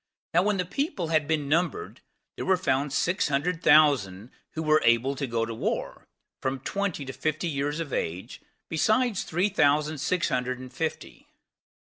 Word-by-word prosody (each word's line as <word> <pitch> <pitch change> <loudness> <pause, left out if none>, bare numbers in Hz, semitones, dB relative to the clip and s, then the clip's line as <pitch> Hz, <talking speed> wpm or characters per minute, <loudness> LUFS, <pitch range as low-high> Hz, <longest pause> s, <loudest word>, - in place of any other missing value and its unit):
Now 175 - +5
when 205 +1 +1
the 180 - -1
people 200 - -2
had 155 -2 +2
been 155 -3 0
numbered, 180 - -1 0.3
there - - -5
were 190 -1 +4
found 140 -5 0
six 170 +6 +1
hundred 160 +4 -1
thousand 130 -10 +4 0.2
that 160 - -2
were 155 0 +4
able 120 +4 +3
to 140 0 -3
go 115 -1 -1
to 115 - -5
war, 110 - -3 0.3
from 130 0 -2
twenty 195 -2 -2
to 130 - -6
fifty 155 +4 -2
years 145 0 -2
of 155 -5 -5
age, 85 +3 -4 0.3
besides 215 +7 +1
three 180 +5 0
thousand 150 -4 +2
six 180 +5 0
hundred 125 0 -1
and 130 0 -10
fifty. 160 +4 -5
155 Hz, 170 wpm, -27 LUFS, 130-175 Hz, 0.3 s, Now